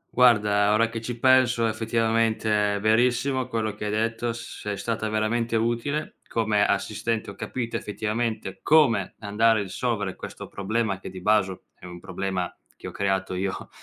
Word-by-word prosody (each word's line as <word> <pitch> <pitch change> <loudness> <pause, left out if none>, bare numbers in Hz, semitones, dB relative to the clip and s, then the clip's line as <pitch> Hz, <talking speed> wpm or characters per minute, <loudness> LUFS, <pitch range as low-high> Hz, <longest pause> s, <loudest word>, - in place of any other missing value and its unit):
Guarda, 105 -4 +4
ora 115 +1 +3
che 115 -1 -5
ci 120 +1 -5
penso 125 -2 +4
effettivamente 110 -2 +1
è - - -2
verissimo 125 +4 +2
quello 110 -3 -2
che 105 0 -6
hai 105 - -1
detto, 115 +2 -1
sei 105 -3 -6
stata 110 -1 -2
veramente 115 +2 0
utile 120 +7 -1
come 110 -2 +1
assistente, 110 +2 -1
ho - - -12
capito 120 -2 -3
effettivamente 110 -1 -3
come 135 -11 +3
andare 110 +1 +3
a - - -1
risolvere 105 -1 -2
questo - - -8
problema, 100 0 -2
che - - -8
di 95 - -8
baso 95 -1 +1
è - - -15
un 90 -1 -9
problema 95 0 -3 0.2
che - - -8
ho - - -6
creato 95 -1 -1
io 95 +1 -3
110 Hz, 160 wpm, -25 LUFS, 100-115 Hz, 0.2 s, Guarda